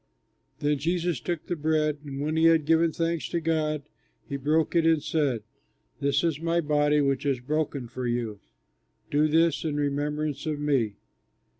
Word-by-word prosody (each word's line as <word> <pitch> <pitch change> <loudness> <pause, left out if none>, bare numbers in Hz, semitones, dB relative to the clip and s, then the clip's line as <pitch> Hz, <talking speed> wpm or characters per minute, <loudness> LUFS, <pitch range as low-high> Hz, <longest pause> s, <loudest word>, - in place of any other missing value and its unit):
Then 145 -1 +1
Jesus 170 -1 0
took 165 +6 -4
the 175 - -2
bread 155 -1 0
and, 140 -2 -6
when 155 +2 -1
he 160 0 +3
had 165 -2 +5
given 165 +1 +3
thanks 165 0 -2
to 170 - -1
God, 155 -2 0 0.4
he 140 - -4
broke 155 +5 +1
it 170 - +4
and 160 -2 +3
said, 145 -7 0 0.6
"This 140 +1 +1
is 165 -4 0
my 165 +1 +1
body 150 -1 +2
which 140 -1 +1
is 140 -3 0
broken 145 -1 -2
for 125 +1 -4
you; 120 -4 -2 0.7
do 150 +2 +3
this 160 -2 +2
in 155 -3 -2
remembrance 145 0 -2
of 150 -2 -2
me." 135 -8 +1
150 Hz, 170 wpm, -27 LUFS, 140-160 Hz, 0.7 s, had